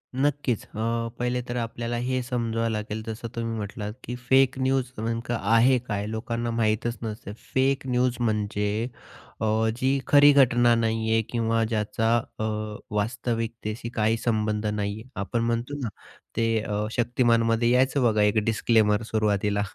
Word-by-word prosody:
नक्कीच. 140 -4 0
अ, 115 +1 -2
पहिले 125 0 0
तर 120 - -4
आपल्याला 115 0 -3
हे 130 0 0
समजवावं 115 -2 -1
लागेल 105 0 -3
जसं 115 +1 -5
तुम्ही 115 -1 -2
म्हटलात 105 0 -5
की 120 - -5
फेक 130 +1 +3
न्यूज 130 -1 +1
नेमक 115 +2 -3
आहे 115 +4 +4
काय, 105 -1 -2
लोकांना 115 +1 -3
माहीतच 115 +1 0
नसते 105 -2 -6 0.2
फेक 135 0 +2
न्यूज 125 -1 +1
म्हणजे 105 0 0 0.5
अ, - - +1 0.3
जी 135 +2 +1
खरी 145 0 +7
घटना 120 -3 +5
नाही 115 -1 0
आहे 115 0 +4
किंवा 115 -1 +1
ज्याचा 110 +1 0
अ, 110 -1 -5 0.5
वास्तविकतशी 115 0 -2
काही 110 +1 +2
संबंध 110 -2 -1
नाही 100 -1 -1
आहे. 125 - -15
आपण 115 +4 -1
म्हणतो 120 +5 -2
ना 120 - -2 0.5
ते 115 - +2
अ, 105 0 -2
शक्तिमानमध्ये 115 -1 +2
यायचं 130 +2 +3
बघा 110 -3 +3
एक 105 +1 +3
डिस्क्लेमर 110 -1 +3
सुरुवातीला 105 -1 +1
115 Hz, 145 wpm, -26 LUFS, 110-120 Hz, 0.5 s, खरी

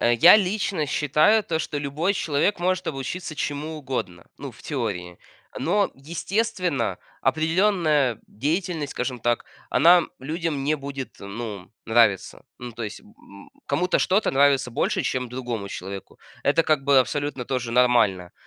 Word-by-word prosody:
э, 120 - +3
я 170 - +8
лично 195 -5 0
считаю 150 +10 +3
то, 160 - -1
что 145 - -3
любой 150 +7 -1
человек 160 +3 0
может 185 +1 0
обучиться 155 +3 -5
чему 150 +2 -3
угодно, 130 - -5
ну, 140 - -7
в 115 - -17
теории. 100 - -4 0.4
Но, 205 -1 +1
естественно, 180 +3 -2 0.2
определенная 160 - +2
деятельность, 155 - -2
скажем 125 -1 -3
так, 120 +1 0 0.3
она 175 +2 +6 0.2
людям 155 0 -3
не 150 +2 +2
будет, 140 -2 -7
ну, 100 -2 -7 0.2
нравиться. 115 -4 +2
Ну, 120 -1 -7
то 115 - -7
есть, 110 -1 -6
м, 100 -1 -17 0.2
кому-то 180 +6 +1
что-то, 195 +3 +2
э, - - -13
нравится 140 -2 +3
больше, 115 - 0
чем 125 -1 -2
другому 120 -5 -5
человеку. 95 0 -8 0.2
Это, 145 +4 +3
как 155 -3 +2
бы, 140 -2 +5
абсолютно 140 0 -1
тоже 125 -2 -3
нормально. 115 -8 +3
140 Hz, 145 wpm, -24 LUFS, 120-165 Hz, 0.4 s, я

